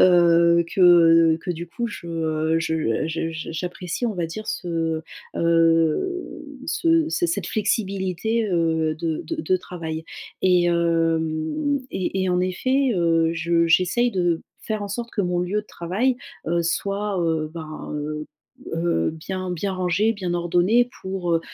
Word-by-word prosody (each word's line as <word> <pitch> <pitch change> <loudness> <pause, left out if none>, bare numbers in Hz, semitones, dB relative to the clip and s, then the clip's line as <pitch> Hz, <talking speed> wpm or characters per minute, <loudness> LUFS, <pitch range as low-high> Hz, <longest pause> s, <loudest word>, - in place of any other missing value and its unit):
Heu, 170 -1 +5
que 165 -3 +6
que 180 - -3
du 170 0 -4
coup 235 +8 -3
je 160 -5 -2
je 160 -5 -1
je 165 0 -2 0.2
j'apprécie 180 +6 -3
on 220 - -2
va 175 -2 -1
dire 215 +7 -7
ce, 165 -5 -2 0.3
heu, 165 - +1 0.2
ce 330 -1 +2
ce 345 +2 +1
cette 335 - -2
flexibilité, 210 +1 -1
heu, 160 -2 +1
de 160 0 -3
de 330 - -4
de 185 - +2
travail. 160 -3 -6 0.4
Et 180 -2 +4
hem, 165 - +1
et 190 +1 -2
et 190 - 0
en 180 0 +2
effet, 255 +9 +1
heu, 165 -2 +2
je 170 +1 +2
j'essaye 185 +9 +3
de 175 -5 0 0.2
faire 215 -1 -3
en 205 - -4
sorte 235 +4 -4
que 205 - -1
mon 180 -1 0
lieu 195 +4 -1
de - - -29
travail, 210 +11 -1 0.3
heu, 170 +1 +1
soit, 200 +4 -1
heu, 160 -2 0
ben, 155 -2 -7
heu, 150 +1 -4 0.5
heu, 165 - +1
bien 185 +3 -5
bien 185 +3 -2
rangé, 185 +4 +1
bien 185 -5 -3
ordonné 180 +8 +2
pour, 190 -2 -2
heu, 165 - +2
175 Hz, 150 wpm, -23 LUFS, 165-200 Hz, 0.5 s, que